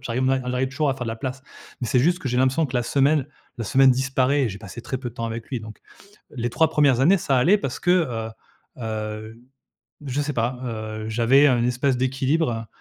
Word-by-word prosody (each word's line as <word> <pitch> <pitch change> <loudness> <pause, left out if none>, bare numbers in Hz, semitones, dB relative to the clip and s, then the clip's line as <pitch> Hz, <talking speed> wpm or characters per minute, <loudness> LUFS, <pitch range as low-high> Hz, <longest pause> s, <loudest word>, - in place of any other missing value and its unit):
j'arri 125 0 -3
ma 130 0 +2
j'arrive 125 +1 -1
toujours 140 +1 0
à - - -1
faire 125 - -5
de 115 - -4
la 115 - -4
place, 130 +1 -5 0.4
mais 120 - -2
c'est 125 - +2
juste 175 +6 +2
que 140 -8 -4
j'ai 125 - -1
l'impression 130 +5 +2
que 125 -2 -3
la 120 - +1
semaine 140 +3 +2 0.3
la 115 - -3
semaine 135 +5 +5
disparaît 135 +2 +1
et 120 - 0
j'ai 100 - -8
passé 110 +2 -9
très 130 -1 -4
peu 125 -2 -5
de 115 - -22
temps 115 - -4
avec 115 0 -6
lui, 125 -4 -3
donc 110 -1 -10 0.6
les 120 -1 -2
3 160 +6 +3
1res 140 -5 +3
années, 175 +8 +5
ça 135 -5 0
allait 185 +11 +4
parce 135 -7 -4
que, 175 - +1
heu 120 -11 0 0.5
heu, 110 0 -5 0.7
je 135 +2 -1
sais 150 +1 -3
pas, 120 +2 -1
heu, 110 -2 -5
j'avais 120 +6 +4
un 120 -3 +3
espèce 125 +2 +1
d'équilibre. 130 -2 0
125 Hz, 230 wpm, -23 LUFS, 115-135 Hz, 0.7 s, semaine